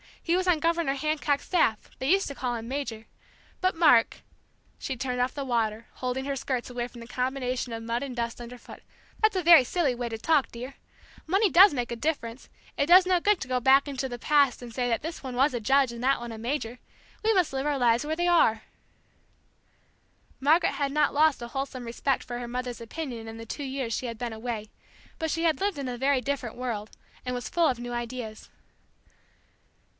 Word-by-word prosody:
He 340 Hz, -, +1 dB
was 370 Hz, 0 st, 0 dB
on 345 Hz, -4 st, +3 dB
Governor 335 Hz, -3 st, +1 dB
Hancock's 295 Hz, 0 st, -1 dB
staff. 230 Hz, -, +1 dB
They 265 Hz, -, -1 dB
used 390 Hz, +3 st, +3 dB
to 280 Hz, -, -5 dB
call 250 Hz, -2 st, -2 dB
him 230 Hz, 0 st, -6 dB
'Major.' 235 Hz, -5 st, -4 dB, 0.5 s
But 370 Hz, -1 st, +1 dB
Mark 300 Hz, -9 st, +4 dB, 0.3 s
" -, -, -38 dB
she 265 Hz, -, -4 dB
turned 250 Hz, 0 st, -3 dB
off 250 Hz, +1 st, +1 dB
the 285 Hz, -, -4 dB
water, 230 Hz, -2 st, -1 dB
holding 255 Hz, +1 st, -3 dB
her 280 Hz, 0 st, -2 dB
skirts 255 Hz, -2 st, -3 dB
away 240 Hz, -1 st, -3 dB
from 240 Hz, -1 st, -13 dB
the 230 Hz, -, -10 dB
combination 255 Hz, 0 st, -2 dB
of 225 Hz, 0 st, -5 dB
mud 230 Hz, +1 st, -2 dB
and 270 Hz, -3 st, -5 dB
dust 235 Hz, -1 st, -3 dB
underfoot, 240 Hz, +1 st, -11 dB, 0.4 s
"that's 435 Hz, -2 st, +3 dB
a 370 Hz, -, 0 dB
very 335 Hz, -4 st, +8 dB
silly 285 Hz, 0 st, 0 dB
way 240 Hz, -1 st, -4 dB
to 225 Hz, -, -4 dB
talk, 300 Hz, +3 st, +2 dB
dear! 250 Hz, +3 st, -8 dB, 0.5 s
Money 390 Hz, +5 st, +3 dB
does 385 Hz, +2 st, +8 dB
make 245 Hz, -3 st, -3 dB
a -, -, -2 dB
difference; 245 Hz, -2 st, -3 dB, 0.3 s
it 285 Hz, -, +1 dB
does 365 Hz, +2 st, +8 dB
no 365 Hz, -1 st, +3 dB
good 410 Hz, +1 st, +2 dB
to 270 Hz, -, -4 dB
go 255 Hz, 0 st, 0 dB
back 270 Hz, +3 st, +5 dB
into 275 Hz, -1 st, -3 dB
the 245 Hz, -1 st, -6 dB
past 280 Hz, 0 st, +2 dB
and 240 Hz, -2 st, -9 dB
say 245 Hz, 0 st, -1 dB
that 230 Hz, -2 st, 0 dB
this 325 Hz, +2 st, -5 dB
one 260 Hz, -2 st, -6 dB
was 270 Hz, +3 st, +3 dB
a 240 Hz, -, -1 dB
judge 270 Hz, +3 st, +3 dB
and 235 Hz, +1 st, -7 dB
that 270 Hz, +1 st, +3 dB
one 240 Hz, 0 st, -6 dB
a 225 Hz, -, -7 dB
major; 240 Hz, 0 st, -3 dB, 0.4 s
we 445 Hz, +1 st, +3 dB
must 365 Hz, -8 st, +2 dB
live 270 Hz, +1 st, -2 dB
our 290 Hz, -1 st, +1 dB
lives 240 Hz, +1 st, +2 dB
where 310 Hz, +1 st, -1 dB
we 350 Hz, +2 st, 0 dB
are!" 225 Hz, -11 st, +3 dB, 1.8 s
Margaret 315 Hz, +5 st, +3 dB
had 280 Hz, -2 st, -1 dB
not 300 Hz, +1 st, +2 dB
lost 305 Hz, -2 st, +3 dB
a 235 Hz, -, -6 dB
wholesome 265 Hz, -1 st, -4 dB
respect 245 Hz, +3 st, -1 dB
for 240 Hz, 0 st, -6 dB
her 240 Hz, -, -5 dB
mother's 245 Hz, -1 st, -4 dB
opinion 235 Hz, -2 st, -6 dB
in 225 Hz, 0 st, -8 dB
the 225 Hz, -, -8 dB
two 285 Hz, +6 st, -6 dB
years 265 Hz, -3 st, -3 dB
she 255 Hz, -, -3 dB
had 230 Hz, -1 st, -6 dB
been 235 Hz, -1 st, -4 dB
away, 220 Hz, -1 st, -5 dB, 0.5 s
but 320 Hz, -, -1 dB
she 330 Hz, +2 st, -1 dB
had 325 Hz, -2 st, +2 dB
lived 400 Hz, -4 st, 0 dB
in 275 Hz, -2 st, -4 dB
a 245 Hz, -, -4 dB
very 270 Hz, +1 st, +2 dB
different 255 Hz, -3 st, -3 dB
world, 230 Hz, -4 st, -4 dB, 0.4 s
and 250 Hz, 0 st, -2 dB
was 245 Hz, -, -5 dB
full 340 Hz, -2 st, +2 dB
of 255 Hz, -, 0 dB
new 240 Hz, 0 st, -6 dB
ideas. 240 Hz, -2 st, -6 dB
255 Hz, 220 wpm, -27 LUFS, 240-300 Hz, 1.8 s, very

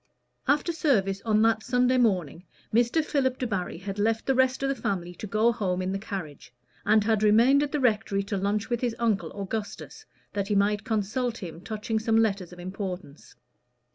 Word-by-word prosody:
After 295 Hz, +5 st, +2 dB
service 200 Hz, -, +1 dB
on 215 Hz, -1 st, +3 dB
that 225 Hz, -1 st, +3 dB
Sunday 250 Hz, +2 st, +2 dB
morning, 180 Hz, -, +1 dB, 0.3 s
Mr. 240 Hz, +7 st, +3 dB
Philip 260 Hz, -4 st, 0 dB
Debarry 195 Hz, -9 st, -3 dB
had 195 Hz, +3 st, -6 dB
left 220 Hz, +2 st, +1 dB
the 270 Hz, -, +2 dB
rest 260 Hz, +1 st, +2 dB
of 275 Hz, -, +1 dB
the -, -, +2 dB
family 180 Hz, -8 st, -3 dB
to 210 Hz, -, -7 dB
go 215 Hz, +4 st, +3 dB
home 190 Hz, -6 st, -1 dB
in 185 Hz, 0 st, -2 dB
the 195 Hz, -, -2 dB
carriage, 180 Hz, -, -7 dB, 0.4 s
and 215 Hz, 0 st, +5 dB
had 220 Hz, -1 st, +1 dB
remained 230 Hz, +7 st, +5 dB
at 290 Hz, -, -1 dB
the 300 Hz, -, 0 dB
rectory 215 Hz, -5 st, +1 dB
to 200 Hz, +1 st, -3 dB
lunch 200 Hz, +2 st, -1 dB
with 240 Hz, -1 st, -2 dB
his 240 Hz, -3 st, -1 dB
uncle 225 Hz, -4 st, 0 dB
Augustus, 220 Hz, -, -6 dB, 0.3 s
that 200 Hz, -1 st, -2 dB
he 205 Hz, -, 0 dB
might 205 Hz, +1 st, +2 dB
consult 235 Hz, +2 st, -1 dB
him 170 Hz, -3 st, -8 dB
touching 220 Hz, +2 st, -3 dB
some 225 Hz, 0 st, +1 dB
letters 200 Hz, -5 st, +1 dB
of 180 Hz, -, -12 dB
importance. 185 Hz, -4 st, -7 dB
215 Hz, 190 wpm, -27 LUFS, 195-245 Hz, 0.4 s, and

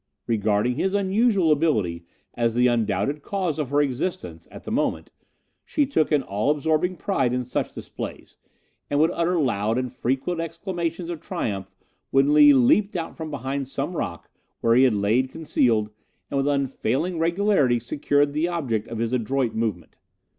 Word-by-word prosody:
Regarding 110 Hz, +1 st, +1 dB
his 190 Hz, +4 st, 0 dB
unusual 200 Hz, -3 st, +2 dB
ability 105 Hz, -, +1 dB, 0.3 s
as 115 Hz, -1 st, 0 dB
the 125 Hz, +1 st, +3 dB
undoubted 120 Hz, +4 st, 0 dB
cause 180 Hz, -3 st, -2 dB
of 145 Hz, -4 st, -2 dB
her 145 Hz, +1 st, +3 dB
existence 150 Hz, +8 st, -4 dB
at -, -, -11 dB
that -, -, -6 dB
moment, -, -, -1 dB, 0.5 s
she 295 Hz, -, 0 dB
took 160 Hz, -, 0 dB
an 145 Hz, -3 st, +3 dB
all 105 Hz, +6 st, -1 dB
absorbing 160 Hz, +4 st, +1 dB
pride 145 Hz, -9 st, 0 dB
in 125 Hz, 0 st, -1 dB
such 125 Hz, -, -3 dB
displays, -, -, -8 dB, 0.5 s
and 145 Hz, -, +1 dB
would 160 Hz, +3 st, +4 dB
utter 170 Hz, +1 st, +1 dB
loud 115 Hz, -5 st, 0 dB
and 125 Hz, -1 st, -3 dB
frequent 135 Hz, +7 st, -1 dB
exclamations 170 Hz, 0 st, -4 dB
of 165 Hz, -, -6 dB
triumph 95 Hz, -3 st, -4 dB, 0.4 s
when 135 Hz, +2 st, +3 dB
Lee 150 Hz, -1 st, +8 dB
leaped 145 Hz, -, +4 dB
out 165 Hz, -2 st, -4 dB
from 160 Hz, -1 st, -6 dB
behind 135 Hz, -1 st, -3 dB
some 140 Hz, +6 st, -3 dB
rock, 85 Hz, -, -4 dB, 0.3 s
where 115 Hz, -, +3 dB
he 130 Hz, +3 st, +6 dB
had 125 Hz, -5 st, +3 dB
lain 110 Hz, +6 st, +2 dB
concealed, 120 Hz, -8 st, 0 dB, 0.4 s
and 140 Hz, -, -1 dB
with 135 Hz, +1 st, +1 dB
unfailing 145 Hz, +4 st, -1 dB
regularity 170 Hz, -, +2 dB
secured 145 Hz, +4 st, 0 dB
the 155 Hz, +3 st, +1 dB
object 135 Hz, -12 st, -2 dB
of 115 Hz, -, -6 dB
his 115 Hz, +2 st, -2 dB
adroit 125 Hz, 0 st, 0 dB
movement. 110 Hz, -6 st, -3 dB
140 Hz, 165 wpm, -24 LUFS, 120-165 Hz, 0.5 s, Lee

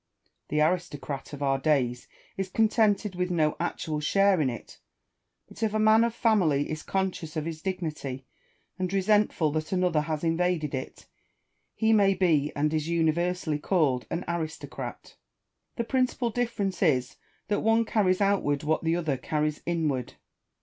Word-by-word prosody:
The 150 Hz, +1 st, 0 dB
aristocrat 155 Hz, -5 st, -2 dB
of 145 Hz, -1 st, -6 dB
our 135 Hz, -1 st, +1 dB
days 130 Hz, -5 st, 0 dB, 0.3 s
is 195 Hz, -1 st, -3 dB
contented 215 Hz, -1 st, +2 dB
with 180 Hz, 0 st, -2 dB
no 155 Hz, -4 st, +1 dB
actual 155 Hz, -2 st, -2 dB
share 195 Hz, +3 st, +3 dB
in 135 Hz, -, +2 dB
it; 120 Hz, -, -9 dB, 0.7 s
but -, -, -14 dB
if 215 Hz, -1 st, 0 dB
a -, -, +2 dB
man 215 Hz, +1 st, +5 dB
of 235 Hz, -1 st, -1 dB
family 175 Hz, -, +2 dB
is 155 Hz, 0 st, -4 dB
conscious 190 Hz, -5 st, -3 dB
of 155 Hz, -1 st, -2 dB
his 160 Hz, -1 st, -5 dB
dignity, 155 Hz, -8 st, -4 dB, 0.5 s
and 185 Hz, -1 st, -1 dB
resentful 195 Hz, -5 st, +2 dB
that 155 Hz, +1 st, -3 dB
another 180 Hz, -4 st, +2 dB
has 155 Hz, 0 st, -3 dB
invaded 165 Hz, -2 st, 0 dB
it, 130 Hz, -, -6 dB, 0.7 s
he 220 Hz, 0 st, +3 dB
may 200 Hz, -2 st, +4 dB
be, 160 Hz, -6 st, +2 dB
and 150 Hz, +2 st, 0 dB
is 155 Hz, -1 st, -1 dB
universally, 170 Hz, -1 st, 0 dB
called 145 Hz, -8 st, +1 dB
an 170 Hz, -, -3 dB
aristocrat. 160 Hz, -3 st, -5 dB, 0.6 s
The 235 Hz, -, -1 dB
principal 255 Hz, -1 st, 0 dB
difference 225 Hz, -5 st, -2 dB
is, 130 Hz, -9 st, +1 dB, 0.3 s
that 205 Hz, -, +1 dB
one 225 Hz, +1 st, +3 dB
carries 195 Hz, -4 st, +1 dB
outward 190 Hz, -8 st, +1 dB
what 155 Hz, +2 st, 0 dB
the 165 Hz, 0 st, +1 dB
other 160 Hz, -6 st, -1 dB
carries 150 Hz, +3 st, -2 dB
inward. 155 Hz, -7 st, -1 dB
170 Hz, 155 wpm, -27 LUFS, 150-195 Hz, 0.7 s, man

